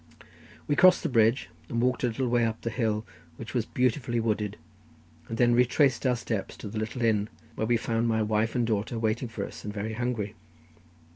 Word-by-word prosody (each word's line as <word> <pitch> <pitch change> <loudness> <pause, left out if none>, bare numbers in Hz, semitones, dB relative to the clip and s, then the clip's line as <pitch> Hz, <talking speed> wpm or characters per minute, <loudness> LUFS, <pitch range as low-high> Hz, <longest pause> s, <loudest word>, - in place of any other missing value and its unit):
We 145 - +2
crossed 185 +3 +6
the - - 0
bridge, 115 +1 +3 0.2
walked 125 +3 0
a - - +4
little 125 +2 -1
way 120 0 +2
up 115 -1 -1
the 115 - -3
hill, 110 -2 -1 0.3
which 115 - -8
was 120 -3 0
beautifully 125 -1 0
wooded, 105 -2 -1 0.7
and 115 - -3
then 120 0 +4
retraced 125 +2 +3
our 125 - +3
steps 110 -4 -4
to - - -7
the 110 +1 -4
little 110 +3 -3
inn, 105 -2 +2 0.2
where 110 - -2
I 120 - +5
found 115 0 0
my 110 -1 +2
wife 110 +1 0
and 120 -1 +2
daughter 110 +1 -1
waiting 115 +2 0
for 115 -3 -4
us, - - -10
and 105 - -4
very 105 +2 -4
hungry. 115 -3 -2
115 Hz, 200 wpm, -28 LUFS, 110-120 Hz, 0.7 s, crossed